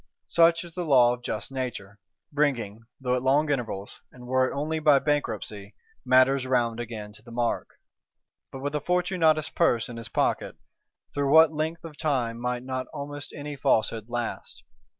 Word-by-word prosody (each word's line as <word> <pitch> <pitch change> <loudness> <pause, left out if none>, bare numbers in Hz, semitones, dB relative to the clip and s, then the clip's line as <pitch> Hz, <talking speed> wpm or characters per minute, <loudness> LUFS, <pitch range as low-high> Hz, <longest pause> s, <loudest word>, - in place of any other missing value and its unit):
Such 165 0 +4
is 170 -1 -10
the 180 - -3
law 125 -6 +5
of 125 - -7
just 110 0 -4
Nature; 115 -6 -5 0.3
bringing, 120 -7 -1
though 125 -1 0
at 125 - -1
long 145 +3 +2
intervals, 115 -7 -3
and 125 -1 -13
were 130 +1 +2
it - - -7
only 155 +3 -2
by 150 -2 +5
Bankruptcy, 110 -8 -2 0.3
matters 130 +1 +4
round 120 -3 +1
again 110 -3 -6
to 105 - -13
the 120 - -15
mark. 120 0 -2 0.7
But 135 - -8
with 145 +1 -2
a 150 - 0
Fortunatus' 175 -3 +2
Purse 120 -10 +1
in 120 - -7
his 115 0 -6
pocket, - - 0 0.6
through 140 -1 0
what 160 0 +7
length 160 +2 -3
of 160 -3 -10
time 125 -7 -1
might 125 0 -2
not 130 0 -4
almost 145 -1 -6
any 145 0 -6
Falsehood 115 -5 +1
last! 120 -1 -5
130 Hz, 170 wpm, -26 LUFS, 120-150 Hz, 0.7 s, what